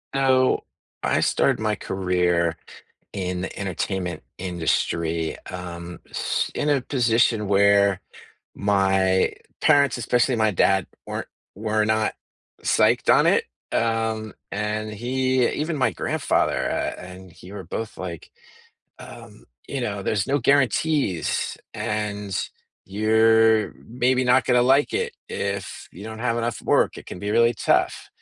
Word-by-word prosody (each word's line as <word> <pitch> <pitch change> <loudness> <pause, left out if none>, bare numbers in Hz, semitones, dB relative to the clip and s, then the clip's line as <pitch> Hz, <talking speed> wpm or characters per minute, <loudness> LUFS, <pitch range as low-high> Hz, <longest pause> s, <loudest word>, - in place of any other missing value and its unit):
So, 130 -1 +3 0.4
I - - +1
started - - +2
my 110 -1 0
career 90 -4 0 0.6
in 90 -2 -3
the 95 - -6
entertainment 95 -1 -3 0.2
industry, 85 -2 -1
um, 90 -1 -7
s - - -2
in 150 - 0
a 140 -2 +2
position 115 -4 +1
where 100 -1 +4 0.6
my 95 -2 +2 0.3
parents, 140 -4 +4
especially 120 +1 +1
my 110 -2 +2
dad, 95 0 +2 0.2
weren't - - -4 0.3
were 105 +1 0
not 110 0 +1 0.5
psyched - - +3
on - - +4
it, - - +3 0.3
um, 115 -1 -1 0.2
and 105 +1 -3
he 130 +3 +1
even 155 +1 -2
my 130 - +2
grandfather, - - 0
uh, - - -2
and 90 0 -11
he 90 +3 -14
were 100 -2 -7
both, 110 +6 -6
like, 90 -3 -7 0.7
"Um, - - -12 0.2
you 140 - -3
know, 100 -4 -3
there's 100 -1 0
no 140 +2 +1
guarantees, 140 - +1 0.2
and 105 -2 -3 0.5
you're 110 +2 +3
maybe 125 +2 +1
not 125 +1 +4
gonna 125 -1 +4
like 135 +3 +3
it. 465 +2 -1
If 100 0 -4
you 95 - -11
don't 110 0 -7
have 115 -1 0
enough 115 -1 -3
work, - - +2
it - - -11
can - - -8
be 105 +2 -4
really 115 +2 +4
tough." - - 0
105 Hz, 130 wpm, -23 LUFS, 95-120 Hz, 0.7 s, where